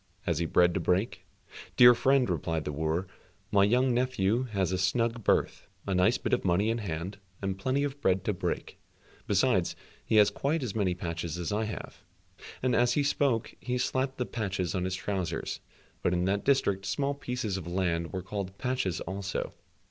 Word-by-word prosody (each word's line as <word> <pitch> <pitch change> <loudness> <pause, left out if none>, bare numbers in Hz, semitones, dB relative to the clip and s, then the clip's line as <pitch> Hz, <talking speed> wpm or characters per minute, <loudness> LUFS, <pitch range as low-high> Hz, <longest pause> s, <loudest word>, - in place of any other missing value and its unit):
Has 85 -4 -1
he 85 - 0
bread 90 +1 +4
to - - 0
break?" 95 +6 0 0.5
"Dear 120 0 +10
friend," 135 +1 +3
replied 80 -2 -2
the 75 - -2
wooer, 80 +5 -1 0.5
"my 100 -1 +5
young 125 +5 +3
nephew 125 -2 +1
has 100 -6 -1
a 95 - 0
snug 115 +5 0
berth, - - +1 0.2
a 95 - -1
nice 90 0 +3
bit - - -2
of - - +2
money 100 +6 +2
in 115 - -1
hand, 95 0 -4 0.2
and 95 -1 -2
plenty 130 +7 0
of 145 0 -4
bread 95 -5 +2
to 105 - 0
break, 90 - -4 0.5
besides 100 -3 +2 0.3
he - - 0
has 105 -1 +6
quite 145 +7 -1
as 115 -6 -3
many 95 -5 +1
patches 85 -2 -4
as 85 +2 -3
I 110 +2 0
have," 110 - -7 0.6
(and 130 -1 +2
as 120 0 +3
he 145 - +2
spoke, 140 -5 +1
he 125 0 -2
slapped 130 +1 -1
the 125 - -1
patches 95 -6 -2
on 90 -2 -1
his 95 0 -1
trousers, 95 -4 -3 0.4
but 90 - +1
in 90 0 +1
that 100 +2 0
district 100 -8 +1
small 140 +9 0
pieces 125 -7 -3
of 95 -3 -5
land 85 -2 -1
were 95 -2 -4
called 95 0 -5
patches 125 -9 -1
also.) 95 +1 -4
100 Hz, 190 wpm, -29 LUFS, 90-125 Hz, 0.6 s, Dear